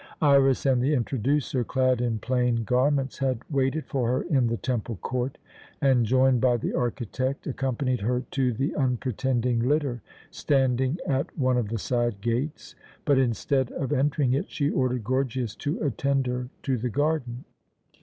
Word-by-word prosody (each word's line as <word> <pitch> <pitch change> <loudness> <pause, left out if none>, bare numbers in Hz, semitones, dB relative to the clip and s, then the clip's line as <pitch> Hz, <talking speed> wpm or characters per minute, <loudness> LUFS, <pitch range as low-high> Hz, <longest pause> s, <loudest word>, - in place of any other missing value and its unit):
Iras 140 -3 +4
and 130 -2 +3
the 145 +4 +2
"Introducer," 130 +1 0
clad 130 0 +1
in 120 -2 0
plain 125 0 0
garments, 130 +2 +1
had 130 -2 +1
waited 140 +2 0
for 130 -5 -1
her 130 +3 0
in 135 -8 +2
the 115 0 -1
temple 120 -2 -2
court 125 +7 -3 0.4
and, 130 -5 +3
joined 130 0 +3
by 125 -2 +3
the - - -3
architect, 125 +2 -2
accompanied 130 -2 -1
her 125 +4 0
to 130 -2 +1
the 135 +6 -1
unpretending 125 -2 0
litter 130 -1 0 0.3
standing 130 +1 +1
at 135 -1 -1
one 130 -2 +2
of 110 -4 -2
the 115 - -2
side 120 -1 -1
gates 120 +8 -3 0.3
but, 140 -3 +4
instead 130 +1 0
of 140 +1 -2
entering 140 -1 +1
it, 140 - -1
she 145 -1 -1
ordered 125 -2 0
Gorgias 130 -1 -1
to 145 +1 -2
attend 140 -1 0
her 125 0 -3
to 130 -3 0
the 125 +2 -2
garden. 135 -2 -1
130 Hz, 160 wpm, -26 LUFS, 120-135 Hz, 0.4 s, Iras